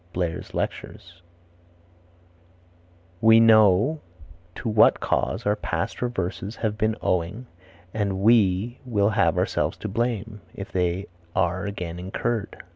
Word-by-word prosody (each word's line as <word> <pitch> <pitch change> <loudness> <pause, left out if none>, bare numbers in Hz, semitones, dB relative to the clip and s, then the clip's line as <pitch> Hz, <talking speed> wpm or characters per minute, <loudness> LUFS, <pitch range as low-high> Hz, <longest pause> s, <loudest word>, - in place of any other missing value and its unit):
Blair's 85 -2 -3
Lectures. 85 0 -5 2.0
"We 115 0 +7
know 110 +5 +5 0.6
to - - -6
what 110 -1 +5
cause 100 +5 -1
our 105 0 +2
past 105 - -3
reverses 100 -3 -3
have 110 -2 -2
been 110 +1 0
owing 90 +8 -1 0.5
and 100 -3 -1
we 110 +1 +3
will 105 -5 +1
have 105 - +2
ourselves - - 0
to - - -6
blame, 115 -1 -2
if 100 +1 -8
they 90 +1 -1 0.3
are 90 +3 0
again 90 -4 -5
incurred." 100 +4 -3
105 Hz, 120 wpm, -24 LUFS, 95-115 Hz, 2.0 s, We